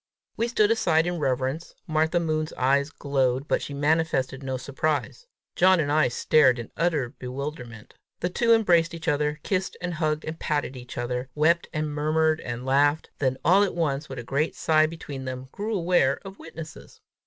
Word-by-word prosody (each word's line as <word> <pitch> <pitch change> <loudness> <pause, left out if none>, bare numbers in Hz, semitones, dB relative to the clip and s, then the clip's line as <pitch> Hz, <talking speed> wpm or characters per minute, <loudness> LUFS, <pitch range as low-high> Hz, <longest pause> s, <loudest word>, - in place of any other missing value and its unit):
We 230 - 0
stood 220 -3 +2
aside 170 -8 +2
in 175 -1 -2
reverence. 135 +3 -2
Martha 160 +1 +1
Moon's 155 -1 -1
eyes 140 +3 +2
glowed, 135 -3 -1
but - - +1
she 140 - -6
manifested 145 -3 0
no 130 -1 -3
surprise. 145 - -2 0.3
John 185 0 +5
and 145 -2 0
I 155 +1 +4
stared 130 +1 +3
in 120 - -7
utter 155 -8 0
bewilderment. 125 -3 -7 0.3
The 175 - -2
two 230 +4 +2
embraced 175 -7 +4
each 165 - -8
other, 150 +1 0
kissed 190 -1 -2
and 175 -1 -3
hugged 155 -1 -1
and 160 +1 -6
patted 145 -3 -1
each 125 0 -10
other, 125 +1 -3
wept 165 +3 +2
and 155 -1 -2
murmured 155 +1 +1
and 120 +1 -5
laughed, 145 +3 +2
then 130 -2 0
all 185 +5 +6
at 200 -4 +1
once, 150 -3 -1
with 130 - -7
one 120 - -6
great 140 +6 -1
sigh 155 -1 +3
between 145 -5 -7
them, 130 0 -6
grew 215 +2 -3
aware 170 -7 +2
of 195 +1 -10
witnesses. 165 -1 -10
150 Hz, 180 wpm, -25 LUFS, 135-165 Hz, 0.3 s, all